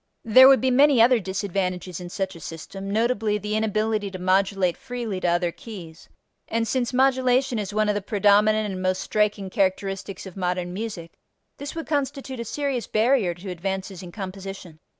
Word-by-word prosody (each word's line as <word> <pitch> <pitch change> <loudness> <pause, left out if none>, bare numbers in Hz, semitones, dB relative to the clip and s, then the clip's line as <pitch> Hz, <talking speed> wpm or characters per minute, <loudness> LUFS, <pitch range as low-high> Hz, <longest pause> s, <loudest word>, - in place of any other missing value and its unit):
There 255 +4 +8
would 270 -1 +6
be 260 0 +2
many 275 0 +5
other 240 +1 +6
disadvantages 185 -2 -3
in 175 -1 -7
such 190 0 -3
a - - -10
system, 175 +5 -8
notably 220 0 +1
the 210 +1 -3
inability 215 -1 0
to 190 - -7
modulate 185 0 +1
freely 235 -6 -5
to 180 - -1
other 175 0 +1
keys, 170 -6 -11 0.4
and 230 0 -1
since 245 +1 0
modulation 260 -1 +2
is 205 -2 -4
one 215 +1 +1
of 210 - +2
the 205 - -2
predominant 210 +1 +3
and 185 - -5
most 185 0 0
striking 210 -2 0
characteristics 195 0 -1
of 190 - -10
modern 180 -1 -2
music, 190 -5 -5 0.5
this 285 +2 -6
would 325 - -4
constitute 275 -3 -3
a 235 - -4
serious 275 0 -2
barrier 220 -5 +2
to 185 +2 -7
advances 190 +1 -4
in 180 -2 -9
composition. 190 -4 -8
205 Hz, 175 wpm, -24 LUFS, 185-230 Hz, 0.5 s, There